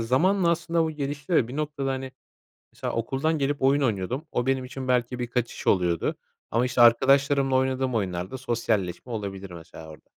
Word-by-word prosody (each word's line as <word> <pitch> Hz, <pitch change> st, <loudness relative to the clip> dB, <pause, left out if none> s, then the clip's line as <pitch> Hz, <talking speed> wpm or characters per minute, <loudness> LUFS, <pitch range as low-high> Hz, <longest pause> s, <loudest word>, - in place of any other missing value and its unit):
zamanla 170 Hz, -, +2 dB
aslında 170 Hz, 0 st, +1 dB
bu 160 Hz, -, -1 dB
gelişti 145 Hz, +2 st, -4 dB
ve 120 Hz, -7 st, +3 dB
bir 130 Hz, -, -6 dB
noktada, 150 Hz, -3 st, -2 dB
hani, 130 Hz, 0 st, -4 dB, 0.6 s
mesela -, -, -4 dB
okuldan 135 Hz, +7 st, -1 dB
gelip 145 Hz, 0 st, -1 dB
oyun 140 Hz, +2 st, +4 dB
oynuyordum. 120 Hz, -, -1 dB
O 120 Hz, +1 st, -1 dB
benim 135 Hz, -1 st, +1 dB
için 130 Hz, 0 st, -7 dB
belki 125 Hz, 0 st, +1 dB
bir 120 Hz, -, -2 dB
kaçış 120 Hz, 0 st, -3 dB
oluyordu 90 Hz, -3 st, +1 dB, 0.3 s
ama, 120 Hz, +2 st, +2 dB
işte, 125 Hz, -1 st, -1 dB
arkadaşlarımla 135 Hz, +3 st, +5 dB
oynadığım 130 Hz, -1 st, 0 dB
oyunlarda 95 Hz, +2 st, -2 dB
sosyalleşme 115 Hz, -4 st, -2 dB
olabilir 100 Hz, -3 st, -5 dB
mesela 80 Hz, -2 st, -11 dB
orada. 75 Hz, -, -14 dB
130 Hz, 170 wpm, -26 LUFS, 115-140 Hz, 0.6 s, arkadaşlarımla